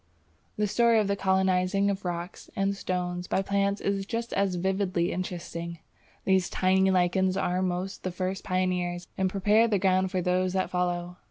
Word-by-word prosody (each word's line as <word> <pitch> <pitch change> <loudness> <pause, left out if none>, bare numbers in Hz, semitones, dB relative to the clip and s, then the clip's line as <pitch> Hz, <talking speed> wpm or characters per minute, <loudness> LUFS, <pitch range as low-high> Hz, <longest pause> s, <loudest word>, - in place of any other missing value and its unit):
The 210 - +2
story 230 +2 +3
of 210 - +1
the 200 - +1
colonizing 190 +1 +2
of 195 -1 -5
rocks 175 0 -5
and 195 0 0
stones 180 -2 -3
by 195 - 0
plants 200 +1 0
is 195 0 0
just 230 0 -3
as 195 -2 +1
vividly 185 -1 0
interesting. 170 -2 -5 0.5
These 190 -2 +2
tiny 190 +1 +3
lichens 185 +1 +2
are 180 -1 0
almost 185 +1 -2
the 185 - -2
first 185 +1 -3
pioneers, 180 -1 -1
and 190 0 +1
prepare 210 +4 +3
the 210 -3 +2
ground 190 0 +2
for 185 -1 -1
those 185 +1 +1
that 190 -1 -1
follow. 180 0 -1
185 Hz, 170 wpm, -27 LUFS, 180-195 Hz, 0.5 s, story